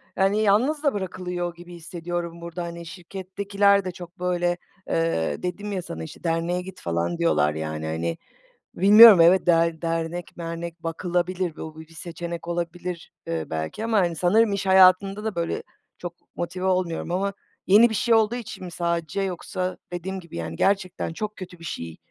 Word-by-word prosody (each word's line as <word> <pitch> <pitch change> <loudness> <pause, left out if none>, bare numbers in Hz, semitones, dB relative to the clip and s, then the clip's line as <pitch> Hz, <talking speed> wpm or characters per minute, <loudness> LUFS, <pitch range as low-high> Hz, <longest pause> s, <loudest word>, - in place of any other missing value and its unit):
hani, 195 +2 +2
yalnız 245 +9 +2
da 285 - +3
bırakılıyor 180 -2 -4
gibi 175 +1 -12
hissediyorum 170 0 -5
burada, 170 +1 -5
hani, 170 0 -7
şirkettekiler 195 +3 0
de 185 - -2
çok 175 0 -11
böyle, 175 -1 0 0.3
ııı, 165 - 0
dedim 205 +4 -3
ya 190 -2 -2
sana 80 - -7
işte 80 - -10
derneğe 170 +1 0
git 185 0 -10
falan 85 - -1
diyorlar, 75 - +2
yani, 80 0 -4
hani, 80 +1 -2 0.6
bilmiyorum 210 0 +9
evet, 175 +3 +6
der 165 -1 +3
dernek 165 +1 -3
mernek 170 0 -6
bakılabilir, 175 +1 -1
bu 160 0 -8
bi 160 - -12
bir 165 - -18
seçenek 170 0 -6
olabilir, 175 0 -4 0.2
ııı, 80 -1 -3
belki. 80 - -3
Ama, 225 -2 +2
hani, 175 -3 +1
sanırım 205 +6 +3
iş 200 0 -2
hayatında 190 +2 +5
da 220 -2 -2
böyle 170 0 -2 0.4
çok 175 -1 -6 0.2
motive 180 +2 -4
olmuyorum. 180 -3 0
Ama 195 +3 0 0.3
yeni 220 +5 +7
bir - - -2
şey 230 +2 +3
olduğu 220 +1 +3
için 235 -5 -7
mi 180 - -6
sadece 170 +2 -1
yoksa 185 0 -3 0.2
dediğim 190 +2 -4
gibi 170 - -11
yani, 85 0 -4
gerçekten 190 -4 0
çok 215 +4 -5
kötü 180 -2 -9
bir 165 - -12
şey 85 - -5
175 Hz, 170 wpm, -25 LUFS, 165-190 Hz, 0.6 s, bilmiyorum